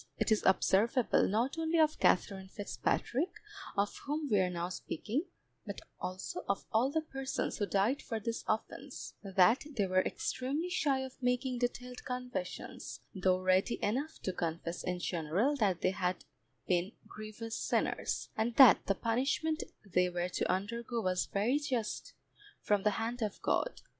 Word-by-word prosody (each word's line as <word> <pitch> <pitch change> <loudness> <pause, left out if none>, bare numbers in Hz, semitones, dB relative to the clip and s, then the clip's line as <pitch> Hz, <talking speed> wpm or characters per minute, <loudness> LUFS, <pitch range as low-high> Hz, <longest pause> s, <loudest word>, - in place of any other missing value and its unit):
It - - 0
is 215 - +4
observable 215 +5 +4
not 240 +10 0
only 325 +1 +1
of 310 -1 +3
Katherine 190 +1 +2
Fitzpatrick, 250 - -1 0.4
of 200 +1 +1
whom 300 +1 -1
we 205 - +5
are 185 -1 +2
now 175 0 -2
speaking, 220 - -3 0.4
but - - -6 0.2
also 185 +1 -4
of 200 - 0
all 235 +5 +4
the 320 +3 0
persons 270 -5 -3
who 205 - +1
died 205 +9 +2
for 225 -4 -3
this 230 +2 -3
offence, 255 +5 -3
that 195 +4 +4
they 205 - +3
were 185 0 +3
extremely 285 - -2
shy 280 -6 +2
of 265 0 -8
making 250 0 0
detailed 250 0 -3
confessions, 250 -7 -5
though 185 -2 +2
ready 185 +4 +3
enough 270 +10 -1
to 185 - -1
confess 170 0 -3
in 180 -1 -1
general 175 - 0
that 195 -7 +1
they 185 - +3
had 185 -1 -2 0.4
been 180 +3 +1
grievous 215 +1 -7
sinners, - - -1
and 225 +2 0
that 265 -5 +9
the 195 - +3
punishment 270 +9 0 0.2
they 180 -1 +2
were 175 0 -2
to - - 0
undergo 230 +5 -2
was 185 -3 0
very 230 +8 +1
just 255 -7 -2 0.5
from 205 -1 +2
the 210 - +3
hand 235 +2 -2
of 210 -3 -2
God. - - 0
220 Hz, 160 wpm, -33 LUFS, 190-260 Hz, 0.5 s, that